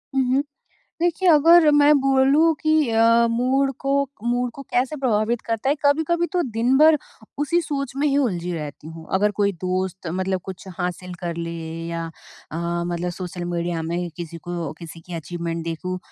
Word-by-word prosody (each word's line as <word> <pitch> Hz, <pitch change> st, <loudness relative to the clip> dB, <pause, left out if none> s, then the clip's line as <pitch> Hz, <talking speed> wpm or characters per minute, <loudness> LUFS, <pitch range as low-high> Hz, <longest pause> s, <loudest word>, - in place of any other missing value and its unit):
हुँ, 265 Hz, -, +3 dB
हुँ। 275 Hz, +2 st, +2 dB, 0.6 s
देखिए, 350 Hz, +2 st, +2 dB
अगर 325 Hz, 0 st, +7 dB
मैं 290 Hz, 0 st, +6 dB
बोलूँ 275 Hz, +4 st, +4 dB
कि 310 Hz, -3 st, +2 dB
अ, 230 Hz, +1 st, +4 dB
मूड 260 Hz, +4 st, +1 dB
को 275 Hz, 0 st, 0 dB, 0.3 s
मूड 245 Hz, +1 st, 0 dB
को 275 Hz, -, -8 dB
कैसे 255 Hz, +5 st, 0 dB
प्रभावित 235 Hz, -3 st, 0 dB
करता 230 Hz, +2 st, -1 dB
है, 285 Hz, -, +4 dB
कभी-कभी 320 Hz, +4 st, +2 dB
तो 360 Hz, -1 st, +2 dB
दिन 235 Hz, +4 st, +2 dB
भर 310 Hz, 0 st, +6 dB, 0.4 s
उसी 295 Hz, +4 st, +1 dB
सोच 280 Hz, -5 st, -3 dB
में 285 Hz, +2 st, +1 dB
ही 280 Hz, -1 st, +2 dB
उलझी 180 Hz, -11 st, 0 dB
रहती 150 Hz, -2 st, -6 dB
हूँ। 160 Hz, 0 st, -10 dB
अगर 205 Hz, +2 st, +3 dB
कोई 200 Hz, 0 st, +3 dB
दोस्त 185 Hz, 0 st, -2 dB
मतलब 185 Hz, +2 st, -1 dB
कुछ 190 Hz, 0 st, -8 dB
हासिल 180 Hz, 0 st, -4 dB
कर 170 Hz, -1 st, -4 dB
ले 170 Hz, 0 st, -4 dB, 0.4 s
या 170 Hz, 0 st, -3 dB, 0.5 s
अ, 155 Hz, -, -5 dB, 0.3 s
मतलब 175 Hz, 0 st, -2 dB
सोशल 175 Hz, 0 st, -6 dB
मीडिया 170 Hz, -1 st, -2 dB
में 165 Hz, +2 st, -3 dB
ही 175 Hz, 0 st, -2 dB
किसी 170 Hz, -1 st, -7 dB
को 170 Hz, -4 st, -3 dB
किसी 165 Hz, 0 st, -9 dB
की 175 Hz, +1 st, -10 dB
अचीवमेंट 170 Hz, 0 st, -4 dB
देखूँ 180 Hz, +3 st, -4 dB
215 Hz, 180 wpm, -22 LUFS, 175-275 Hz, 0.6 s, अगर